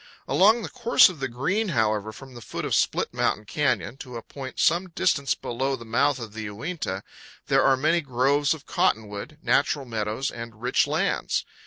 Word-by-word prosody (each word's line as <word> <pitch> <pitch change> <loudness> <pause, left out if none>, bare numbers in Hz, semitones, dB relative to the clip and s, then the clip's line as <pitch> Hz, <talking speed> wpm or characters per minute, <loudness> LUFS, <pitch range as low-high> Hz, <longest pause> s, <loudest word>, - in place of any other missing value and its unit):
Along 220 +5 +4
the - - -5
course 240 -4 +5
of 175 -5 -9
the 135 - -1
Green, 180 - -1
however, 110 - 0
from 135 +3 -12
the 120 - -10
foot - - -5
of - - -2
Split - - +1
Mountain 105 - 0
Canyon 125 - -1
to 125 -3 -9
a 115 - -8
point 130 -2 -8
some 175 +3 +2
distance 140 -4 +1
below 135 +3 -2
the 115 -2 -11
mouth 125 +6 +2
of 115 -4 -8
the 110 0 -5
Uinta, 105 - -4 0.4
there - - +3
are 135 -1 +4
many 155 +5 +2
groves 140 +2 +1
of 155 - -14
cottonwood, 105 +7 -1
natural 140 0 +1
meadows, 110 +2 -2
and 115 -2 -9
rich 125 +2 +2
lands. - - 0
130 Hz, 185 wpm, -25 LUFS, 110-150 Hz, 0.4 s, course